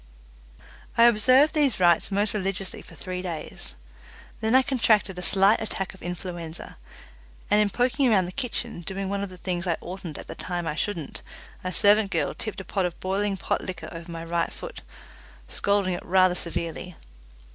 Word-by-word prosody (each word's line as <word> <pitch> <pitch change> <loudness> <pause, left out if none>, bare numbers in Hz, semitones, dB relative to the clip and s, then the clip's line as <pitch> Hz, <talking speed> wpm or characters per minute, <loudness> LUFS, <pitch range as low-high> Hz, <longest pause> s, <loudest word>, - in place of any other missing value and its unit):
I 230 - +7
observed 255 +6 +6
these 285 -9 +2
rites 175 -2 +4
most 205 +1 0
religiously 195 -2 -2
for - - -13
three 180 -1 -5
days. 170 -4 -6 0.6
Then 220 +2 +2
I 260 - +7
contracted 215 -8 +2
a - - -4
slight 195 +4 +4
attack 195 -3 -2
of 190 - -16
influenza, 175 -2 -6 0.7
and 210 +1 +6
in 210 - +3
poking 250 +4 +2
around 195 -5 +4
the 180 - -5
kitchen, 235 -3 -3
doing 190 +3 -4
one 200 0 -1
of 200 - -3
the 185 - -11
things 180 0 -2
I 170 - +1
oughtn't 175 -4 -7
at - - -6
the - - -5
time 175 -1 -3
I 155 - -1
shouldn't, 165 -2 -3 0.4
a 185 - -2
servant 205 +2 +4
girl - - 0
tipped 215 -3 -5
a - - -11
pot 190 -2 0
of 175 - -9
boiling 195 +1 0
pot - - -1
liquor 185 -3 -6
over 165 0 -8
my 165 0 -5
right 170 0 0
foot, - - -8 0.7
scalding 200 -2 +1
it 175 - -4
rather 185 0 +4
severely. 170 0 -4
190 Hz, 180 wpm, -26 LUFS, 175-210 Hz, 0.7 s, I